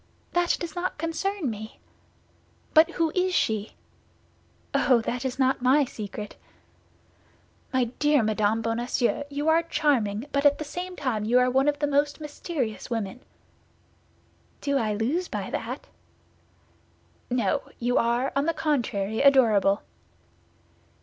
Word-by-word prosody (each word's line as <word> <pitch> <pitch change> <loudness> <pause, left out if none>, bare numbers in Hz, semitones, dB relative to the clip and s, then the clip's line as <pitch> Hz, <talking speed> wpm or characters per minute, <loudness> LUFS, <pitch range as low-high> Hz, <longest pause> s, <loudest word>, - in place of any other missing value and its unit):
"That 350 0 +2
does 340 0 -6
not 360 +1 -2
concern 330 +2 -2
me." 220 +1 -9 0.9
"But 315 0 +7
who 330 -2 +1
is 365 0 +1
she?" 215 -1 0 1.0
"Oh, 250 -3 +4
that 245 +2 -3
is 260 -2 -3
not 260 -1 +2
my 270 +3 +4
secret." 210 -3 -7 1.3
"My 260 -1 +2
dear 285 +3 +2
Madame 215 +1 +1
Bonacieux, 240 +4 0
you 290 +2 -3
are 320 +1 +5
charming; 255 -10 0
but 280 0 +1
at 290 -1 +5
the - - -4
same 360 +4 -6
time 255 -9 -2
you 235 +4 +3
are 250 0 +4
one 265 +2 +2
of 295 0 +2
the 295 - 0
most 285 +1 +1
mysterious 290 - -4
women." 225 -1 -3 1.4
"Do 280 -1 0
I 215 -3 0
lose 285 - -1
by - - -5
that?" - - -4 1.4
"No; 240 -6 +1 0.2
you 245 +1 +1
are, 240 +3 +1
on 280 +1 +1
the 330 - +1
contrary, 220 -8 -1
adorable." 225 -8 +4
260 Hz, 135 wpm, -26 LUFS, 225-300 Hz, 1.4 s, But